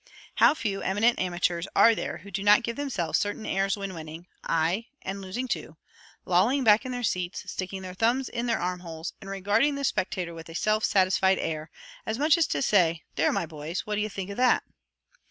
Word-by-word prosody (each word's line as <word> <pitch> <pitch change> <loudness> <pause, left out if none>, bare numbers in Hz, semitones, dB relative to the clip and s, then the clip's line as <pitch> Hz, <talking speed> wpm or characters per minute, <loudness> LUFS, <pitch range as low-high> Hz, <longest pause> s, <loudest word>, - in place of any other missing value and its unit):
How - - +6
few 205 -7 -3
eminent 215 +5 +2
amateurs 175 -1 -1
are 230 - +7
there - - -4
who 200 - -13
do 195 - -3
not 205 +4 +5
give 235 0 -3
themselves 250 - -1
certain 205 +1 -3
airs 195 +1 0
when 195 -1 -5
winning 160 +1 -8 0.2
aye, 170 +8 0 0.2
and 195 +1 -4
losing 195 +7 -4
too 165 -8 -4 0.5
lolling 215 +10 +3
back 215 +2 +5
in - - -4
their 245 -1 -4
seats, 180 -3 -2
sticking 190 0 -5
their 185 -1 -7
thumbs 235 +6 +1
in 240 0 -3
their 230 -2 +1
arm 180 0 -2
holes, 165 -1 -7
and 195 - -9
regarding 205 +9 +1
the 280 - -4
spectators 185 -7 -1
with 165 0 -10
a 165 - -9
self 215 +3 +1
satisfied 190 -1 +3
air, 155 0 -3 0.3
as 220 - -3
much 300 +3 +4
as 335 -3 +2
to - - -1
say 170 -8 +3
"There, 155 - +2
my - - -1
boys, 155 +2 -5
what 210 - -3
d'ye 210 +1 0
think 195 -1 -5
of 200 - -7
that?" 250 0 +3
195 Hz, 210 wpm, -27 LUFS, 175-225 Hz, 0.5 s, are